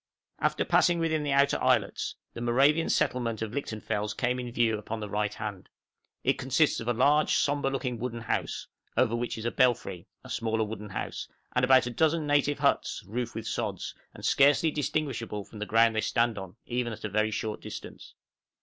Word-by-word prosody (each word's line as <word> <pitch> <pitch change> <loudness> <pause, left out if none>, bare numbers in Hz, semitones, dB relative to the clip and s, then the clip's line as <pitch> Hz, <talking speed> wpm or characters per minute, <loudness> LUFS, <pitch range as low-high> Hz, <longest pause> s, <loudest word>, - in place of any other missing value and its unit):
After - - +1
passing 175 -1 +4
within 160 -2 +1
the 145 -1 -1
outer 140 +1 +3
islets, - - +1 0.2
the 115 - -7
Moravian 140 +7 +3
settlement 115 -3 0
of 110 - -4
Lichtenfels 105 -5 -3
came 125 0 0
in 125 -1 -5
view 115 -2 +2
upon 110 +1 -5
the 105 - -4
right 105 0 -1
hand; 105 -4 -6 0.5
it - - +1
consists 135 +4 +2
of 115 - -6
a - - +3
large, 145 +6 +3
sombre 145 -1 +1
looking 130 -3 -3
wooden 120 -1 -4
house, 115 - -2 0.3
over 115 -2 +3
which 120 0 -2
is 110 - -6
a 120 - +1
belfry, 120 -8 +1 0.2
a - - -12
smaller 110 -1 0
wooden 105 -1 -6
house, - - -4 0.3
and - - +2
about 130 -1 +6
a 120 - -3
dozen 160 +4 +2
native 145 0 +2
huts, 140 -1 +1
roofed 120 +5 -4
with 115 - -5
sods, 105 -5 -3 0.2
and - - -9
scarcely 145 +3 +4
distinguishable 135 -8 -2
from 105 - -12
the 105 - -3
ground 115 0 +4
they 110 - +2
stand 115 0 +1
on, 95 -2 -8
even 120 -1 -2
at - - -10
a - - 0
very 110 +2 +1
short 110 0 -3
distance. - - -9
120 Hz, 195 wpm, -28 LUFS, 110-140 Hz, 0.5 s, about